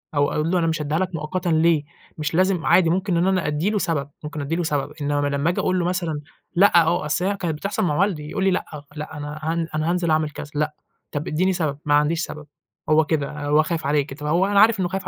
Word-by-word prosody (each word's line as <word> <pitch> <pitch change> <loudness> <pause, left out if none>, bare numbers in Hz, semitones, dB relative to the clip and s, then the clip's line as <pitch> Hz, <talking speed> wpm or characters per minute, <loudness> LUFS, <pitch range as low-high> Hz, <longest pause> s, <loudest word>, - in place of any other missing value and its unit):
أو 145 0 +2
أقول 155 +2 0
له 185 - +2
أنا 165 - +1
مش 160 -1 -1
هادّيها 150 +3 -1
لك 185 - 0
مؤقتًا 170 +3 -3
ليه، 160 -1 +3 0.3
مش 150 0 -3
لازم 185 -1 +2
عادي 175 -3 +5
ممكن 185 +1 +1
إن 175 +2 +2
أنا 185 -4 +1
أدّي 150 +6 0
له 215 - 0
سَبب، 160 -7 -1
ممكن 150 0 -5
أدّي 145 +4 -2
له 175 - -1
سَبب 145 -3 -1
إنّما 145 0 0
لمّا 140 +3 0
أنت 175 - -2
تقول 185 0 +1
له 175 - 0
مثلًا 170 -4 -2 0.3
لأ، 175 -1 +6
آه 175 +1 0
أصل 160 +4 0
هي 200 +1 0
كانت 165 -4 -2
بتحصل 195 +7 -2
مع 155 -5 +1
والدي، 165 -7 0
يقول 190 - -2
لي 195 - +3
لأ، 185 - -1 0.3
لأ، 150 0 -6
أنا 150 +1 -6
هن 165 +1 -1
أنا 155 +1 0
هانزِل 175 -2 0
أعمل 155 -1 +2
كذا 145 0 -9
لأ. 150 +1 0 0.4
طَب 145 +1 -4
ادّيني 185 +5 +1
سَبب 155 -5 -1
ما 145 - +2
عنديش 150 +3 +2
سَبب 150 -1 -9 0.4
هو 155 0 +5
كده 145 -2 -1
آآ، 150 -1 -6
هو 150 +2 +4
خايف 160 -1 -3
عليك، 145 -1 0
طَب 150 - -4
هو 170 +5 +3
أنا 200 0 +3
عارف 225 -1 +5
إنّه 180 - +1
خايف 190 +2 -4
160 Hz, 260 wpm, -22 LUFS, 150-180 Hz, 0.4 s, لأ